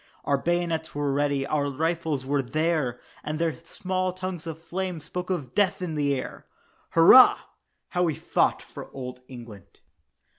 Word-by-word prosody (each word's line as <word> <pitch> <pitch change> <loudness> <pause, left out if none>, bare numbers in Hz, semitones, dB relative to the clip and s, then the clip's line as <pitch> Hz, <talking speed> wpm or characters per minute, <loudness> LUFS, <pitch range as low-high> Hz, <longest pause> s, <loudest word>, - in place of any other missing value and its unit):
Our 140 -1 +1
bayonets 170 -1 -1
were 145 -1 0
ready, 140 -1 0
our 145 -1 0
rifles 160 -1 -1
were 140 +1 +1
there, 145 -2 -1 0.2
And 155 +1 -3
their 165 -1 0
small 185 +3 -3
tongues 185 -3 -6
of 160 -1 -5
flame 180 +1 -4
spoke 180 +4 -6
of 145 -9 -3
death 205 -1 +2
in 180 -3 -4
the 145 -2 +1
air! 130 - -7 0.5
"Hurrah, 170 +10 +8 0.5
how 180 - -1
we 165 -4 +1
fought - - 0
for - - -10
Old 125 -1 -7
England." 115 -7 -12
160 Hz, 155 wpm, -26 LUFS, 140-175 Hz, 0.5 s, Hurrah